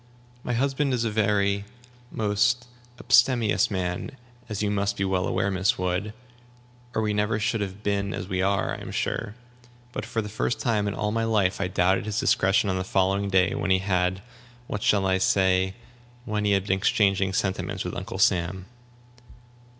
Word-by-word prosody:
My 120 - -2
husband 135 +2 +1
is 120 -1 -1
a 110 - -1
very 100 -1 +1 0.5
most 110 +4 +1 0.3
abstemious 120 -3 +3
man, 90 -3 -3 0.4
as 105 -1 -3
you 105 - 0
must 100 0 -1
be 100 - 0
well 95 -1 0
aware, 100 +1 0
Miss 95 0 +1
Wood, 90 +3 -1 0.8
or 110 - +1
we 105 -1 0
never 105 +1 0
should 110 +1 0
have 100 +1 -5
been 100 -1 0
as 90 - -5
we 95 -1 -1
are, 100 +1 +1
I - - -7
am - - -7
sure. 105 - -3 0.6
But, - - -4
for 110 -2 -2
the - - -6
first 110 +3 -2
time 110 -4 0
in 100 - -2
all 105 - -1
my 115 +1 0
life, 100 -4 +1
I 95 - 0
doubted 95 +3 +1
his 105 +2 -1
discretion 100 +2 +2
on 95 -1 0
the - - -2
following 95 +1 +1
day, 95 -1 +3
when 100 - -2
he 95 - +5
had 95 0 0 0.4
what 105 -3 -4
shall 100 -2 +2
I 95 0 +2
say? 95 0 +2 0.5
when 105 -3 -2
he 100 - +3
had 95 -1 +1
been 95 -1 +1
exchanging 100 -1 +2
sentiments 95 -1 -2
with - - -4
Uncle - - -5
Sam." 90 +1 +1
100 Hz, 185 wpm, -25 LUFS, 95-105 Hz, 0.8 s, he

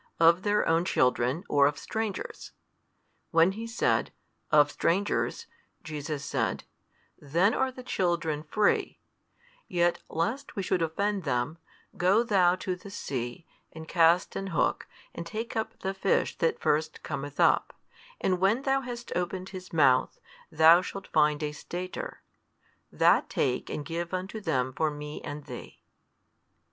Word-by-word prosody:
of 165 +2 +6
their 210 +1 +1
own. 165 +1 +3
children 130 -1 +1
or 140 -1 +4
of 145 0 -2
strangers? 220 +1 -5 0.8
When 165 +2 +4
he 225 +4 -6
said, 230 +1 +1 0.4
Of 145 -1 +5
strangers, 205 - 0 0.4
Jesus 150 -2 -5
said, - - -1 0.6
Then 170 - +2
are 265 0 +1
the 255 0 -10
children 170 -8 -1
free; 205 +7 +1 0.7
yet 175 -1 +1
lest 225 - -2
we 195 - -2
should 180 - 0
offend 195 +5 -1
them, 130 +3 -1 0.4
go 195 +6 +4
thou 185 -6 +4
to 185 0 -3
the 180 +3 -12
sea, 130 -5 -5 0.3
and 160 0 -9
cast 170 +1 +3
an 195 - -3
hook, 165 -7 0 0.3
and 170 - -5
take 215 +7 -5
up 220 0 -3
the 190 0 -2
fish 195 0 +1
that 165 - +1
first 155 0 0
cometh 145 +1 -5
up; - - +4 0.5
and 185 -1 +1
when 205 +8 +2
thou 270 0 +2
hast 240 -2 -7
opened 180 +1 -2
his 185 -1 -9
mouth, 130 -5 +3 0.3
thou 160 +2 +7
shalt 195 +2 -7
find 150 -1 +2
a 150 - -1
stater: 180 +4 -6 0.7
that - - +3
take 125 -2 -1
and 150 - -4
give 170 +3 -3
unto 190 +4 -5
them 130 -8 0
for 155 +3 +1
Me 150 0 -7
and 145 0 -6
thee. - - -10
170 Hz, 145 wpm, -28 LUFS, 150-195 Hz, 0.8 s, thou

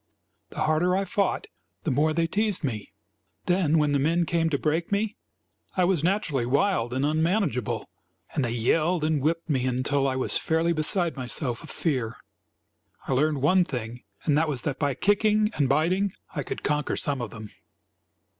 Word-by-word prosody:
The - - -6
harder 175 +4 +2
I 195 - 0
fought, 200 0 0 0.4
the - - 0
more 150 +4 +2
they 165 +1 +1
teased 205 +2 -1
me. 110 -7 -3 0.5
Then 175 -3 +2
when 150 -1 +2
the 140 - +2
men 165 +5 +2
came 165 0 +1
to 145 - +1
break 160 +5 -1
me, 205 +1 0 0.6
I 185 - +4
was 175 -4 +2
naturally 170 - +1
wild 135 - +1
and 130 +2 0
unmanageable; 160 - 0 0.5
and 140 - 0
they 120 - 0
yelled 155 +9 +1
and 155 -2 +1
whipped 165 +4 0
me 130 -5 0
until 135 +2 +1
I 130 - 0
was 130 - -1
fairly 165 +1 +1
beside 165 +2 +1
myself 125 -1 -1
with - - -11
fear. 125 -9 -1 0.9
I - - 0
learned 145 +1 +1
one 180 +5 +5
thing, 120 -6 -5 0.2
and 150 - +2
that 160 0 +1
was 135 -5 -2
that 135 -2 -2
by 145 -3 0
kicking 210 - +2
and 140 -3 +1
biting 180 +7 +2 0.2
I 145 - -1
could - - -6
conquer 150 0 0
some 140 -3 0
of 120 - -4
them. 110 0 -9
155 Hz, 180 wpm, -26 LUFS, 135-175 Hz, 0.9 s, one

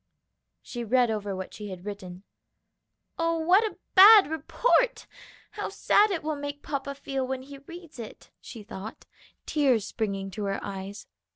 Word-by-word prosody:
She 240 -1 -6
read 240 +1 +2
over 205 -2 -3
what 190 0 -7
she 210 -1 -8
had 185 -1 -9
written. 190 -3 -8 1.0
"Oh, 330 0 +1
what 360 +6 +4
a 435 - -4 0.2
bad 405 +1 +10
report! 470 - +1 0.5
How - - -4
sad 420 +1 +3
it 360 -6 -2
will 310 0 -2
make 285 0 -6
papa 280 -1 -4
feel 270 -1 -3
when 260 0 -4
he 280 +1 -11
reads 330 0 -12
it!" 225 - -10
she 225 -4 -10
thought, 205 +1 -9 0.4
tears 260 -9 +2
springing 195 -4 -3
to 210 +2 -4
her 195 0 -2
eyes. 195 0 -7
260 Hz, 160 wpm, -27 LUFS, 205-315 Hz, 1.0 s, bad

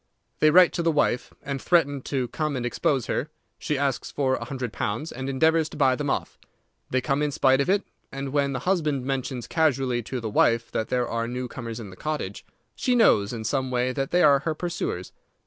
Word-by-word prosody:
They 155 - +5
write 180 +2 +6
to 170 - -1
the 165 0 +2
wife, 145 -5 +1
and 140 -2 -4
threaten 145 -6 +2
to 130 -3 0
come 155 -2 -2
and 125 -1 -2
expose 125 +1 0
her. 150 - -2 0.3
She 150 - -1
asks 140 -2 -1
for 135 -2 0
a - - -2
hundred 130 -5 -5
pounds, 120 +10 -3
and 130 +2 -5
endeavours 160 +4 +2
to - - -10
buy 130 -3 +4
them 145 +2 -3
off. - - -2 0.5
They 130 - +1
come 140 +2 0
in 150 - +1
spite 135 -1 +3
of 140 - -1
it, 200 +1 +3 0.3
and 135 0 -4
when 140 -1 +1
the - - -3
husband 155 -8 0
mentions 130 -2 -3
casually 135 -6 +1
to 125 +3 -5
the 115 - -4
wife 115 +2 +2
that 110 - -1
there 125 -1 0
are 115 0 -2
new 125 +1 -4
comers 115 -2 -6
in 105 -4 -8
the - - -11
cottage, 155 +7 -4 0.3
she 250 -2 +1
knows 105 - +4
in 115 -2 -5
some 130 +3 -1
way 125 0 0
that 135 +1 -2
they 175 0 +3
are 140 -2 +6
her 155 +3 -2
pursuers. 170 - -4
135 Hz, 220 wpm, -25 LUFS, 125-150 Hz, 0.5 s, write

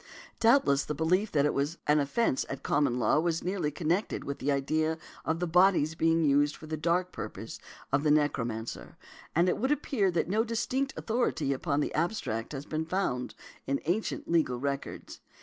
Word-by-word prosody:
Doubtless 225 - +4
the 150 - -4
belief 180 +7 +1
that 145 -2 +3
it 150 - +1
was 145 +5 -1
an 150 +1 +4
offence 140 - +1
at 135 - -6
Common 140 -4 +1
Law 125 +4 +3
was 165 0 0
nearly 180 -4 -1
connected 170 +6 -1
|154| - - -13
with 140 - -4
the 145 - 0
idea 155 +3 0 0.3
of 160 +1 0
the 180 - 0
bodies 175 -2 +4
being 165 0 +2
used 145 +1 +3
for - - -11
the 155 0 -3
dark 175 +4 0
purposes - - -7 0.3
of 140 +1 +2
the 150 - +1
necromancer, 120 -7 -1 0.4
and 170 +3 +4
it 180 - +1
would 260 +4 +1
appear 265 -9 +1
that 170 -2 0
no 215 +5 +2
distinct 240 +4 -1
authority 220 - 0
upon 140 +2 -1
the - - -2
abstract 150 - -1
point - - -9
has 135 0 -5
been 155 +1 -3
found 145 -9 -2 0.3
in 140 0 0
ancient 185 +7 -1
legal 160 -7 +2
records. 140 +2 -4
160 Hz, 190 wpm, -29 LUFS, 140-180 Hz, 0.4 s, Doubtless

